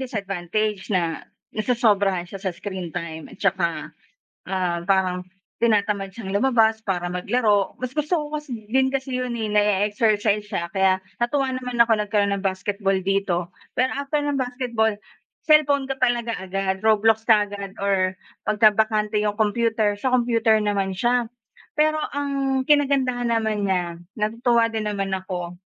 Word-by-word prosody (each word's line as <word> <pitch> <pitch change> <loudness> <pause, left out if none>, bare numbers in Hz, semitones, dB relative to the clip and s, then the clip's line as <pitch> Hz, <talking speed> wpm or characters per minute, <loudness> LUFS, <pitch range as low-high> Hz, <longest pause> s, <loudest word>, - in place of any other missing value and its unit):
disadvantage 205 -3 -2
na 170 -5 0 0.3
nasosobrahan 205 -5 +1
siya 190 +2 -9
sa 190 - -2
screen 185 -2 -5
time 165 -2 -6
at - - -13
saka, 185 -4 -1 0.6
ah, 180 -3 -1
parang 185 -1 +1 0.4
tinatamad 205 -3 +1
siyang 195 -5 -6
lumabas 225 -4 +3
para 180 -4 -2
maglaro 205 +2 +1
mas 255 0 -4
gusto 305 +4 0
ko 300 -2 -2
kasi 260 -8 -5
din 265 0 +3
kasi 265 -1 -3
yun, 250 -1 -3
eh, 220 - -2
na-e-exercise 210 0 +2
siya, 170 0 -3
kaya 190 -1 +3 0.2
natuwa 265 +2 +1
naman 250 -1 -4
ako 230 - -2
nagkaroon 205 -1 +1
ng 200 0 -4
basketball 195 +1 0
dito, 190 -2 -1 0.2
pero 255 +1 +2
after 285 +1 -2
ng 290 -1 0
basketball, 245 -4 0 0.5
cellphone 290 -3 +4
ka 270 0 -4
talaga 240 -2 +1
agad, 190 0 -2
Roblox 220 0 +3
kaagad 205 -1 +1
or 190 -2 0 0.3
pagkabante 215 0 +3
yung 210 -1 -1
computer, 220 0 +1
sa 260 - 0
computer 230 -2 +3
naman 200 -2 0
siya. 240 +2 +2 0.5
Pero 310 0 +4 0.2
ang 275 -2 0
kinagandahan 265 -5 +2
naman 220 -2 0
niya, 180 -3 -1 0.2
natutuwa 230 +2 +2
din 215 -1 -2
naman 195 -1 -2
ako 180 -2 -5
210 Hz, 145 wpm, -23 LUFS, 195-245 Hz, 0.6 s, cellphone